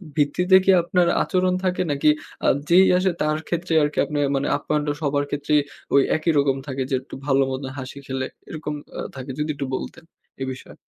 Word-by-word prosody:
ভিত্তিতে 170 Hz, +5 st, +3 dB
কি 195 Hz, -, +6 dB
আপনার 175 Hz, 0 st, +2 dB, 0.2 s
আচরণ 185 Hz, -1 st, +1 dB
থাকে? 185 Hz, -1 st, 0 dB
নাকি 145 Hz, +1 st, +3 dB, 0.4 s
আ -, -, +4 dB, 0.2 s
যেই 185 Hz, +3 st, +7 dB
আসে, 185 Hz, +1 st, +2 dB
তার 155 Hz, 0 st, +1 dB
ক্ষেত্রে 170 Hz, 0 st, -2 dB
আরকি 150 Hz, 0 st, -2 dB
আপনার 150 Hz, -1 st, -2 dB
মানে 135 Hz, +1 st, 0 dB
আপ্যায়নটা 150 Hz, -1 st, -1 dB
সবার 145 Hz, -1 st, +1 dB
ক্ষেত্রেই 145 Hz, +1 st, +1 dB, 0.3 s
ওই 140 Hz, -, +7 dB
একই 160 Hz, +1 st, +1 dB
রকম 140 Hz, -1 st, +2 dB
থাকে 135 Hz, -1 st, -3 dB
যে, 135 Hz, -, +1 dB
একটু 130 Hz, -, -11 dB
ভালো 135 Hz, -1 st, +3 dB
মত 130 Hz, +1 st, -3 dB, 0.2 s
হাসি 130 Hz, +1 st, -7 dB
খেলে 130 Hz, 0 st, -2 dB, 0.2 s
এরকম 155 Hz, -1 st, -5 dB, 0.3 s
আ -, -, -2 dB
থাকে? 135 Hz, 0 st, -6 dB
যদি 150 Hz, +1 st, -1 dB
একটু 140 Hz, -, -3 dB
বলতেন -, -, -7 dB, 0.4 s
এ -, -, 0 dB
বিষয়ে। 130 Hz, -, -13 dB
150 Hz, 190 wpm, -23 LUFS, 140-170 Hz, 0.4 s, যেই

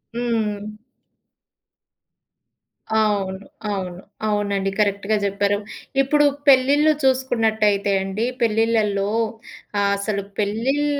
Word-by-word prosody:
హ్మ్. 220 Hz, -4 st, -1 dB, 2.3 s
అవును. 200 Hz, -3 st, 0 dB, 0.3 s
అవును. 185 Hz, -3 st, -4 dB, 0.3 s
అవునండి. 200 Hz, -2 st, 0 dB
కరెక్ట్‌గా 200 Hz, 0 st, +1 dB
జెప్పారు. 200 Hz, 0 st, +1 dB, 0.4 s
ఇప్పుడు 295 Hz, +2 st, +3 dB, 0.2 s
పెళ్ళిళ్ళు 280 Hz, +3 st, +5 dB
జూసుకున్నట్టయితే 220 Hz, -6 st, +2 dB
అండి 195 Hz, +4 st, -2 dB, 0.2 s
పెళ్ళిళ్ళల్లో 220 Hz, -3 st, +1 dB, 0.9 s
అసలు 200 Hz, 0 st, -2 dB, 0.2 s
పెళ్ళిళ్ 230 Hz, +8 st, 0 dB
210 Hz, 70 wpm, -22 LUFS, 200-235 Hz, 2.3 s, పెళ్ళిళ్ళు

